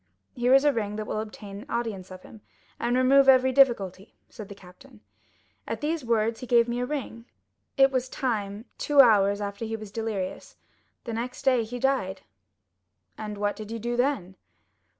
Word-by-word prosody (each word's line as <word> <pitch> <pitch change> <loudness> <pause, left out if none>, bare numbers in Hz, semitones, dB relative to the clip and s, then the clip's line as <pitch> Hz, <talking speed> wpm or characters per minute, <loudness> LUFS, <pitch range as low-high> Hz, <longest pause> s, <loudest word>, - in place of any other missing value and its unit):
"'Here 250 0 +3
is 270 - +5
a 290 - +4
ring 210 -3 -3
that 215 0 -4
will 215 - -3
obtain 210 -1 -8
audience 215 -6 -3
of 185 -1 -11
him, 220 - -14 0.4
and 240 +1 0
remove 270 +1 +5
every 260 0 +5
difficulty,' 215 -8 +2
said 215 -4 -10
the 200 - -9
captain. 205 +6 -17 0.7
At - - -3
these 310 0 -2
words 230 -1 0
he 250 - -8
gave 235 -1 +4
me 240 +1 -2
a 250 - -2
ring. 250 -5 -5 0.5
It 270 0 +5
was 255 -1 -1
time—two 230 +4 -2
hours 205 -5 +5
after 200 +2 -5
he 225 0 -3
was 215 -2 -9
delirious; 215 -4 -4 0.5
the 235 - -5
next 240 +3 -5
day 255 -3 +3
he 235 +3 -6
died." 235 -8 -1 0.9
"And 210 -1 -6
what 205 0 -1
did 215 -1 -9
you 230 - -4
do 240 +2 -3
then?" 240 -8 -1
230 Hz, 175 wpm, -26 LUFS, 205-255 Hz, 0.9 s, is